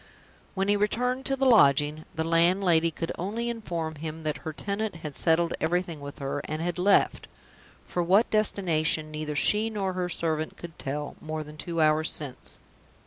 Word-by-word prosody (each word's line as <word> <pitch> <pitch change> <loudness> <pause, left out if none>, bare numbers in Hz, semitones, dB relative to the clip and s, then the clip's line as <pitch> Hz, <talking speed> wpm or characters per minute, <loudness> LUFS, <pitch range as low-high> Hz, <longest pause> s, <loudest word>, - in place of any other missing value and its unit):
When 195 0 0
he 205 - +4
returned 250 +5 0
to 270 - +1
the 270 0 0
lodging, 150 - +5
the 160 - 0
landlady 170 0 +3
could 165 +1 -4
only 220 +7 -2
inform 170 -9 -3
him 160 +1 -6
that 150 -2 -1
her 160 - -5
tenant 200 +5 -3
had 155 -4 -7
settled 165 0 +2
everything 170 -1 -1
with 140 0 -8
her, 140 +1 -3
and 155 +1 -3
had 175 +1 -2
left 195 +2 +3 0.6
(for 175 - -2
what 190 +7 +4
destination 160 -7 +1
neither 150 -1 -4
she 210 +8 +2
nor 195 -4 -2
her 180 -1 -2
servant 160 -2 -1
could 170 -1 -10
tell) 145 +2 -4
more 155 0 -4
than 150 0 -11
two 165 +2 -4
hours 155 0 +3
since. 140 -4 -4
165 Hz, 175 wpm, -27 LUFS, 155-200 Hz, 0.6 s, lodging